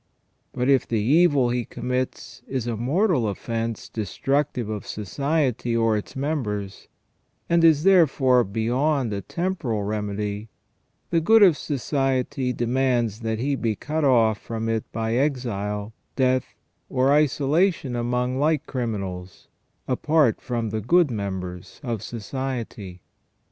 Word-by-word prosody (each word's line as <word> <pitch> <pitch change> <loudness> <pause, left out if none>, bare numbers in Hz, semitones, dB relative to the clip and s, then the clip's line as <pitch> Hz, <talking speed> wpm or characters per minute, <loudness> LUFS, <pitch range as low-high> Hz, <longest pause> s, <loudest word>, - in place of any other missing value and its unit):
But 125 0 -1
if 135 -2 +3
the 115 - 0
evil 140 +1 +4
he 125 0 0
commits 125 +2 -4
is 130 -3 -2
a 120 -1 -2
mortal 140 - +1
offence 115 +2 -3
destructive 125 +4 -1
of 105 -1 -5
society 125 - -1
or 115 -1 +2
its 105 - -5
members, 115 -9 -3 0.6
and 170 0 +3
is 155 -2 +5
therefore 140 -9 +5
beyond 120 +5 0
a 100 - -3
temporal 160 - -2
remedy, 105 0 -3 0.6
the 165 -1 +3
good 220 +6 +6
of 180 -6 +7
society 135 -2 -1
demands 120 -3 0
that 110 -1 -2
he 140 +5 -1
be 115 -4 -1
cut 155 +8 -3
off 115 -6 +4
from 115 -1 -4
it 110 -1 -2
by 115 0 -2
exile, 115 -6 -1 0.2
death, 130 -1 +1 0.3
or 130 +2 +2
isolation 150 0 +2
among 125 +2 -1
like 150 0 +1
criminals, 100 -7 -5 0.4
apart 145 -1 +2
from 120 -4 -3
the 110 0 -2
good 165 - +3
members 95 -4 -5
of 115 -6 -3
society. 115 -6 -5
125 Hz, 130 wpm, -24 LUFS, 110-140 Hz, 0.6 s, of